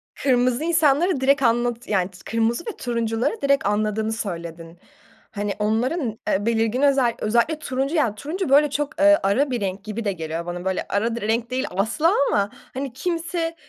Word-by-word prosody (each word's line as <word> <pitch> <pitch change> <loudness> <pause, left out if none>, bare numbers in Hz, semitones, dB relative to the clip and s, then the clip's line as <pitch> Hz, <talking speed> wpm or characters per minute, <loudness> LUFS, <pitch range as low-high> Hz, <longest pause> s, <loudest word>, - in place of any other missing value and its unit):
Kırmızı 250 0 +1
insanları 320 -1 +2
direkt 275 +1 +3
anlatı 240 0 0
yani 185 -3 +1 0.2
kırmızı 230 +5 0
ve 450 - -6
turuncuları 235 - -1
direkt 280 0 +2
anladığını 215 +1 0
söyledin. 170 -5 -6 0.5
Hani 205 -1 -2
onların, 225 +3 -1
eee, 200 +2 +1
belirgin 225 +2 +1
özel 270 -4 +3
özellikle 235 +8 +1
turuncu 275 +1 -2
yani 245 -10 +1
turuncu 315 - -4
böyle 290 +2 +5
çok, 295 +2 -3
eee, 300 0 +6
ara 260 +9 +2
bir 240 -4 -2
renk 195 0 -3
gibi 215 +1 -5
de 200 - +1
geliyor 165 -1 -5
bana. 175 +1 -5
Böyle 190 -1 -1
ara 225 +3 0
di 235 - -5
renk 225 +3 0
değil 260 +2 -1
asla 230 - +1
ama 200 0 +1 0.2
hani 265 -1 -4
kimse 335 +2 -2
235 Hz, 170 wpm, -23 LUFS, 210-280 Hz, 0.5 s, eee